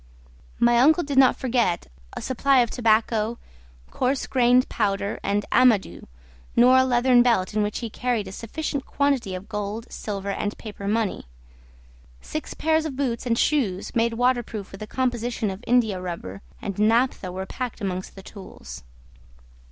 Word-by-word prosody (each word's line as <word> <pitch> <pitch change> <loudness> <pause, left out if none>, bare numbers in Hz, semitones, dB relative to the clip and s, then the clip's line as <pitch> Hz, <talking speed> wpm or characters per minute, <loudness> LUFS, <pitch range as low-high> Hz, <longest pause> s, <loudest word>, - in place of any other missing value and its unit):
My 235 0 +4
uncle 315 +7 +5
did 280 -2 +1
not 260 -2 +6
forget 235 -9 0 0.3
a - - -6
supply 265 +1 +3
of 235 - -1
tobacco, 225 -1 +1 0.5
coarse 260 +1 0
grained 250 0 +3
powder, 200 -2 -1
and 205 +1 -1
amadou, 245 -6 +3 0.5
nor 250 +2 +6
a 260 - +6
leathern 250 -1 +4
belt 230 -7 +2
in 215 - +1
which 205 0 -1
he 230 - -4
carried 240 -5 -1
a - - -7
sufficient 275 +6 -4
quantity 270 -9 0
of 185 +2 -8
gold, 210 +1 -4
silver, 200 -2 -4
and 205 +1 -3
paper 205 -2 -8
money. 210 - -1 0.9
Six 310 - -6
pairs 315 0 +1
of 295 -4 -4
boots 255 -3 -2
and 230 -1 +1
shoes, 230 -13 0
made 230 0 +2
waterproof 240 -4 -1
with 195 - -11
a 215 - -6
composition 240 -4 -1
of 190 +2 -8
indiarubber 185 - -1 0.2
and 200 0 -4
naphtha, 225 -3 +2
were 190 +1 -5
packed 250 +3 -5
amongst 185 -3 -4
the 195 - -11
tools. 195 -2 -11
230 Hz, 155 wpm, -24 LUFS, 200-255 Hz, 0.9 s, not